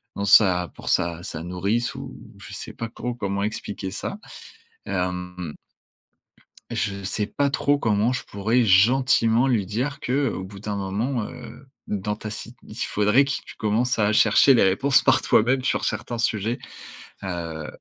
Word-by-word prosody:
dans 100 - -2
sa 90 -3 +5
pour - - -7
sa 85 0 +1
sa 80 -2 -6
nourrice 100 +9 -1
ou 135 0 -8 0.2
je 100 - -11
sais - - -7
pas 115 -1 -5
trop 125 +1 -5
comment 100 -4 -2
expliquer 105 -2 -4
ça. 195 - -5 0.7
Hem. 90 -2 -3 1.2
Je 100 -2 -2
sais 105 +2 -1
pas 140 +5 0
trop 145 +1 +1
comment 110 0 +1
je 125 - -4
pourrais 110 +5 +1
gentiment 115 +3 +4
lui 110 -7 +1
dire 125 +8 -3
que: 135 +1 0
«Au 95 - -5
bout 95 0 -10
d'un 105 -1 -4
moment, 105 +6 -2
heu, 125 +2 -11 0.2
dans 105 +1 -2
ta 110 0 -7
sit 115 +3 -8
il 105 - -11
faudrait 105 +3 +3
qu'il 140 - -3
que - - -12
tu - - -12
commences 115 +3 0
à 105 -1 +3
chercher 115 +6 +6
les 120 - +4
réponses 130 +9 +3
par - - +4
toi-même 130 +4 +3
sur 130 - 0
certains 115 +2 -3
sujets», 110 0 0 0.7
heu 85 -4 -5
105 Hz, 170 wpm, -24 LUFS, 95-125 Hz, 1.2 s, chercher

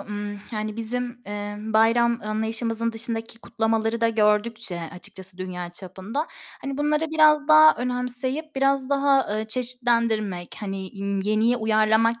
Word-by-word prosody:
ımm, 205 0 -5
yani, 215 0 -3
bizim, 240 +2 -4
emm, 205 +1 -5
bayram 230 +2 +4
anlayışımızın 225 +2 -1
dışındaki 225 0 -4
kutlamaları 225 0 -1
da 230 - +3
gördükçe 215 -3 +1
açıkçası 190 0 -9
dünya 180 -1 -5
çapında, 190 - -5 0.3
hani, 275 0 -5
bunları 300 +2 +1
biraz 305 -2 +4
daha 310 0 +8
önemseyip 250 +5 -3
biraz 275 -1 +2
daha, 275 -1 +4
ııı, 215 +1 -2
çeşitlendirmek, 230 -6 0
hani, 195 -2 -5
ımm, 200 0 -1
yeniye 215 +4 +2
uyarlamak 220 +1 +2
225 Hz, 130 wpm, -24 LUFS, 210-250 Hz, 0.3 s, daha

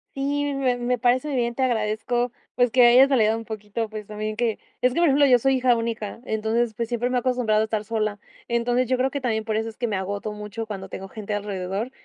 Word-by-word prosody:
Sí, 285 +1 -1
me 260 -3 +1
me 245 0 -1
parece 255 +4 +2
bien. 240 -1 0
Te 265 - 0
agradezco, 240 +1 0 0.2
pues, 245 0 +3
que 250 +1 +5
hayas 255 +3 +7
validado 220 -5 +3
un 225 0 -6
poquito, 215 +1 -4
pues, 215 -1 -7
también 215 +1 -4
que 230 -1 -1 0.2
es 250 0 +3
que, 335 - 0
por 345 - +5
ejemplo, 285 0 +5
yo 250 -3 +5
soy 270 +3 +2
hija 250 -1 +3
única, 230 -1 -4
entonces, 220 +1 0
pues, 230 +1 -2
siempre 240 +1 -1
me 255 - +1
he - - +3
acostumbrado 245 -4 +1
a - - +2
estar 215 -1 -2
sola. 215 -2 -2 0.3
Entonces, 240 +1 +1
yo 255 - +2
creo 260 +1 +1
que 280 +1 -4
también 220 -3 0
por 220 -1 -2
eso 220 +1 -1
es 220 - -13
que 240 - -1
me 210 - -1
agoto 200 +2 -3
mucho 210 +1 -6
cuando 195 -3 -6
tengo 195 - -7
gente 210 +1 -6
alrededor 200 +2 -3
230 Hz, 245 wpm, -24 LUFS, 215-250 Hz, 0.3 s, hayas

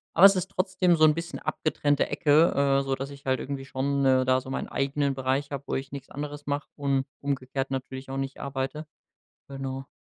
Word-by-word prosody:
aber 185 - +9
es 195 0 +9
ist 185 +1 -2
trotzdem 185 -2 +2
so 155 - +2
'n 155 - +6
bisschen 165 +2 -5
abgetrennte 145 -2 0
Ecke, 145 -3 +4
äh, - - -4
sodass 135 0 -2
ich 140 0 -12
halt 130 -1 +1
irgendwie 135 -1 -5
schon, 140 +1 0
äh, 130 -1 +4
da 130 0 +3
so 130 - -10
meinen 135 - -3
eigenen 140 +1 0
Bereich 135 +2 -1
hab, 140 -1 -5
wo - - -1
ich 135 0 -4
nix 140 -1 -8
anderes 145 0 -6
mach 145 0 -2
und 140 -2 0 0.2
umgekehrt 135 -1 -2
natürlich 130 0 -5
auch 135 - -4
nicht 135 0 -4
arbeite. 140 +3 -3 0.6
Genau. 135 0 -5
140 Hz, 205 wpm, -27 LUFS, 135-145 Hz, 0.6 s, aber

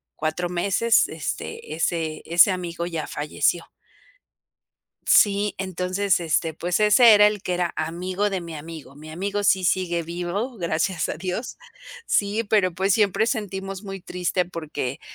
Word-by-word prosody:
4 160 +3 -2
meses, 200 +6 +2
este, 155 0 -5
ese 160 -1 -2
ese 170 +4 +5
amigo 175 -2 -4
ya 165 -3 -4
falleció. 150 +3 -1 1.4
Sí, 205 0 +4
entonces, 185 +1 0
este, 165 0 0
pues 175 +4 -2
ese 215 +2 +7
era 210 0 +7
el 210 -2 -1
que 180 - -2
era 175 -1 -1
amigo 180 +5 -2
de 190 -3 -3
mi 170 -1 -8
amigo. 155 -2 -9
Mi 155 +2 -11
amigo 200 +5 -3
sí 190 -2 +3
sigue 175 -1 0
vivo, 180 +9 -4
gracias 170 +1 -1
a - - -2
Dios. 185 +8 -5 0.5
Sí, 210 - 0
pero 200 -5 +2
pues 190 +2 +1
siempre 210 +1 +2
sentimos 195 -4 -4
muy 195 -2 -7
triste 180 0 -1
porque 155 -6 -5
180 Hz, 145 wpm, -23 LUFS, 165-200 Hz, 1.4 s, ese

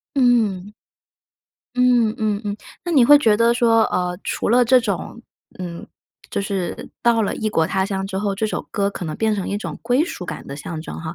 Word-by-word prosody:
嗯。 220 -7 +2 1.0
嗯， 245 -3 +3
嗯， 210 -2 0
嗯。 205 0 -3 0.3
那 345 - -2
你 265 -6 +6
会 290 +3 +8
觉 220 -6 +3
得 230 +1 +4
说， 230 -2 +4
呃， 180 0 -1
除 - - -2
了 245 +2 +5
这 255 +1 +5
种， 215 +1 -4 0.4
嗯， 175 -2 -6 0.4
就 - - -1
是 195 -3 -4
到 230 -2 +3
了 200 - -1
异 220 - -2
国 160 -5 +2
他 190 0 0
乡 195 -1 -3
之 190 -1 -5
后， 200 -1 -1
这 215 +2 -1
首 215 - -4
歌 200 -2 0
可 185 - -6
能 155 - -4
变 220 -1 +1
成 195 - -3
一 200 - -1
种 210 - -6
归 255 +6 +2
属 180 - -6
感 - - -7
的 140 - -7
象 155 +1 -6
征 - - -7
哈， 160 0 -6
210 Hz, 225 characters per minute, -21 LUFS, 190-235 Hz, 1.0 s, 会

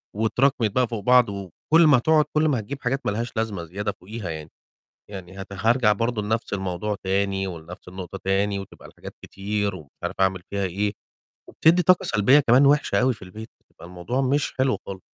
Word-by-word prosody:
واتراكمت 115 +1 +1
بقى 125 +1 +1
فوق 110 -4 -5
بعض 125 -2 +5
و 100 -2 -6 0.2
وكل 165 0 +7
ما 145 - +6
هتقعُد 155 +4 +3
كل 155 +1 +2
ما 135 -6 +1
هتجيب 135 +6 -7
حاجات 135 +2 -1
ما - - +1
لهاش 115 +2 -3
لازمة 105 -6 -2
زيادة 100 +5 -4
فوقيها 100 0 -8
يعني. 80 -1 -6 0.6
يعني 95 -1 -9
هت 100 +1 -9
هارجع 115 +3 +2
برضه 115 +1 -1
لنَفْس 110 +1 -2
الموضوع 95 +2 -2
تاني 95 0 0
ولنَفْس 90 +2 -10
النقطة 95 +1 -8
تاني 100 +1 0
وتبقى 100 - -11
الحاجات - - -11
كتير 100 0 -3
ومش 75 -6 -12
عارف - - -3
أعمل 95 -1 +1
فيها 100 -1 -2
إيه، 100 +3 -2 0.6
وبتدّي 170 +3 +3
طاقة 185 0 +4
سلبية 115 +7 +4
كمان 130 +1 +5
وِحشة 140 -8 +3
أوي 130 0 +2
في - - -19
البيت، 105 +5 -10 0.3
فالموضوع 90 +9 -4
مش 140 +2 0
حلو 130 0 +2
خال 95 -1 -7
105 Hz, 190 wpm, -24 LUFS, 95-125 Hz, 0.6 s, وكل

